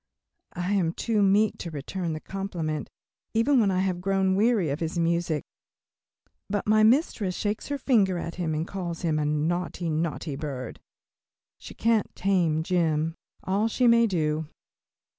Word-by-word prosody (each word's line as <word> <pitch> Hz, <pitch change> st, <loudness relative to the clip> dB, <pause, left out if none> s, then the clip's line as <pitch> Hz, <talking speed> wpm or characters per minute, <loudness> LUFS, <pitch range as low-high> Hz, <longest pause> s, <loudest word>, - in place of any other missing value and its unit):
I 180 Hz, +3 st, -1 dB
am 175 Hz, -5 st, +1 dB
too 220 Hz, +1 st, 0 dB
meek 205 Hz, +2 st, +3 dB
to 170 Hz, -, -5 dB
return 165 Hz, +3 st, -4 dB
the 155 Hz, -, -4 dB
compliment, 170 Hz, -6 st, -4 dB, 0.5 s
even 250 Hz, +4 st, +4 dB
when 210 Hz, -4 st, +3 dB
I 185 Hz, -1 st, +1 dB
have 185 Hz, -2 st, -1 dB
grown 190 Hz, 0 st, +1 dB
weary 205 Hz, -, +2 dB
of 145 Hz, -, -2 dB
his 165 Hz, +1 st, -3 dB
music, 170 Hz, -3 st, 0 dB, 1.1 s
but 205 Hz, 0 st, -1 dB
my 215 Hz, 0 st, +4 dB
mistress 220 Hz, -, +2 dB
shakes 205 Hz, 0 st, -2 dB
her 285 Hz, -, -2 dB
finger 210 Hz, -9 st, +2 dB
at 170 Hz, 0 st, -4 dB
him 165 Hz, -3 st, -2 dB
and 160 Hz, +3 st, -2 dB
calls 175 Hz, -4 st, -5 dB
him 155 Hz, -2 st, +1 dB
a 150 Hz, -, 0 dB
"naughty, 165 Hz, +3 st, -1 dB
naughty 155 Hz, -1 st, -2 dB
bird." 135 Hz, -4 st, -6 dB, 0.8 s
She -, -, -11 dB
can't 225 Hz, -2 st, +1 dB
tame 175 Hz, -5 st, +1 dB
Jim, 165 Hz, -3 st, +1 dB, 0.3 s
all 200 Hz, +4 st, +1 dB
she 250 Hz, +3 st, +1 dB
may 235 Hz, -1 st, +6 dB
do. 155 Hz, -4 st, -1 dB
180 Hz, 160 wpm, -26 LUFS, 160-205 Hz, 1.1 s, may